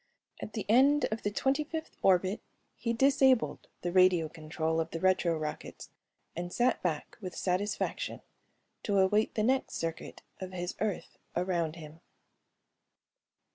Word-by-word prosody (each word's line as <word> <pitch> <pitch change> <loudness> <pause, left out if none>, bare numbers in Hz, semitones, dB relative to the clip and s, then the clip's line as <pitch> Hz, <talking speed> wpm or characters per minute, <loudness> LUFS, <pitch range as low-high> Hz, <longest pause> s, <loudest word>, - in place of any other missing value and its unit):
At 210 - -7
the 215 - -3
end 275 +7 +5
of 220 - -2
the 205 - 0
twenty 270 +8 +1
fifth 315 +1 -6
orbit 190 +2 +3 0.3
he 230 - -2
disabled 265 0 +3 0.2
the 175 - -1
radio 185 -3 +4
control 160 +1 -2
of 160 - -1
the 165 - -5
retro 185 -3 +2
rockets 155 -1 -6 0.5
and 175 +1 -4
sat 245 +3 +1
back 160 +1 -3
with 185 -3 -6
satisfaction 195 +3 -2 0.6
to 200 -2 0
await 205 +3 +3
the 215 - +1
next 260 +3 +1
circuit 165 0 -5 0.2
of 185 0 -7
his 175 0 -3
Earth 200 -4 -3 0.2
around 175 -3 0
Him. 160 -1 -11
185 Hz, 140 wpm, -31 LUFS, 170-225 Hz, 0.6 s, end